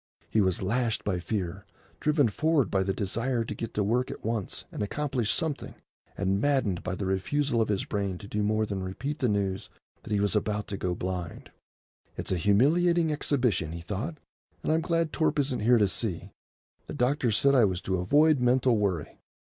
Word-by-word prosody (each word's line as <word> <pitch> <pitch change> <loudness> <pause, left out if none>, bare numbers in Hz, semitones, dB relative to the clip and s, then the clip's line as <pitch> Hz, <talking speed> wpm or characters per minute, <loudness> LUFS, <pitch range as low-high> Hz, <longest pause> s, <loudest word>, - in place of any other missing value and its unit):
He 110 - +3
was 95 -1 +1
lashed 115 +2 0
by 95 -3 -1
fear, 95 0 -3 0.4
driven 150 -3 +3
forward 150 - +1
by 95 - +2
the 95 +1 0
desire 115 +5 -1
to - - -4
get 115 - -6
to 105 - +2
work 120 +5 +1
at - - -8
once 110 -3 -2
and - - -5
accomplish 125 +1 -1
something, 160 -4 -2 0.4
and 95 +1 0
maddened 130 -11 +1
by 95 - -3
the 95 - -4
refusal 115 +7 0
of 110 - 0
his 100 -2 0
brain 100 -3 -2
to 100 - -10
do 105 +1 -2
more 110 +1 +1
than 100 -2 -4
repeat 125 +11 -4
the 125 - +1
news 100 -2 -1 0.3
that - - -10
he 105 - +2
was 100 +1 +1
about 105 0 0
to 100 - -3
go 90 -2 -2
blind. 90 -2 -5 0.7
"It's - - -4
a 95 - +2
humiliating 160 - +3
exhibition," 125 - 0
he 85 - -6
thought, 105 - -4 0.5
"and - - 0
I'm 160 +1 +2
glad 165 -1 0
Torp 155 -2 +1
isn't 135 -3 0
here 120 +3 +4
to 105 -3 +4
see. 95 -3 -3 0.6
The - - -6
doctor 130 0 +1
said 140 +6 +3
I 125 -5 +6
was 95 -3 -1
to 95 -1 -1
avoid 145 - +4
mental 125 -1 +3
worry. 95 -7 -2
110 Hz, 195 wpm, -28 LUFS, 95-140 Hz, 0.7 s, I